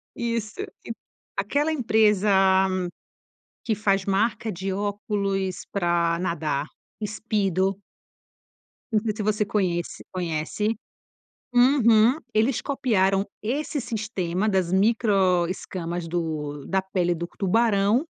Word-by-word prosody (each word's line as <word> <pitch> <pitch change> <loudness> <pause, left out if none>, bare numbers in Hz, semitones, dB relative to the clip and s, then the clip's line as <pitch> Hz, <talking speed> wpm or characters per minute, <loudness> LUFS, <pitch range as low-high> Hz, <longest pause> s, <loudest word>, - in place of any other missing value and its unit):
Isso, 230 -2 -3
aque - - -9 0.5
aquela 285 +11 +1
empresa 220 -7 +3 1.3
que 225 - 0
faz 195 -2 +1
marca 215 +3 0
de 190 +1 -3
óculos 200 -2 -2
para 170 -3 +1
nadar, 155 -5 -1 0.4
Speedo 195 -3 0 1.1
não 215 - +3
sei 215 -1 -1
se 215 - -3
você 210 0 +1
conhece 180 -5 -1
conhece. 180 +5 -2 0.8
Uhum, 245 -2 +5 0.2
eles 225 +4 +2
copiaram 195 -8 +1 0.2
esse 290 +6 -2
sistema 210 -5 -2
das 190 -4 +1
micro 195 -4 +3
escamas 175 -2 -4
do 155 -4 -3
da 190 0 +1
pele 180 -2 0
do 170 +1 -4
tubarão 210 - +3
200 Hz, 100 wpm, -25 LUFS, 180-220 Hz, 1.3 s, Uhum